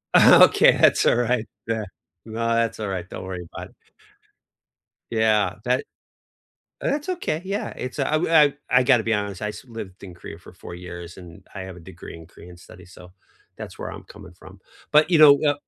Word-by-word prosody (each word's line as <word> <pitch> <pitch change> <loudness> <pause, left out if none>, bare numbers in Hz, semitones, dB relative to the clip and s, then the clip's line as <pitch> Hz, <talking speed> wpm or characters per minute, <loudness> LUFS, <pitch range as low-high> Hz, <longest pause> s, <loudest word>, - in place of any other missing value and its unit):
Okay, - - +7
that's - - +4
alright. 120 -1 +1 0.2
Yeah. 110 -1 -2 0.4
No, 115 +1 -4
that's 115 -1 -1
alright. 95 -4 -5
Don't - - -8
worry 90 -2 -7
about - - -8
it. - - -27 1.4
Yeah. 110 -4 +1
That 125 +1 0 1.0
oh, - - -1
that's 295 +4 -3
okay, 355 - -2
yeah. 195 +2 -3
It's, 130 +2 -7
uh 150 +2 0
I 150 -3 +4 0.2
I 125 +1 +4
gotta 125 -3 +3
be 115 0 0
honest. 100 -2 -4
I - - -1
used 115 +5 -10
lived 105 -5 -10
in 90 -3 -10
Korea 85 -1 -11
for 85 - -16
4 85 - -11
years, 85 -1 -10
and 85 -2 -14
I 100 - -7
have 95 -1 -8
a - - -13
degree 85 +1 -12
in 80 -1 -13
Korean 90 +2 -15
studies, 90 +1 -16
so 90 -1 -15 0.4
that's - - -10
where - - -6
I'm - - -10
coming 100 -3 -14
from. 95 +2 -16 0.3
But, 150 +3 +4
you 165 - +4
know, 145 -2 +8
uh 145 - +3
105 Hz, 190 wpm, -23 LUFS, 90-125 Hz, 1.4 s, know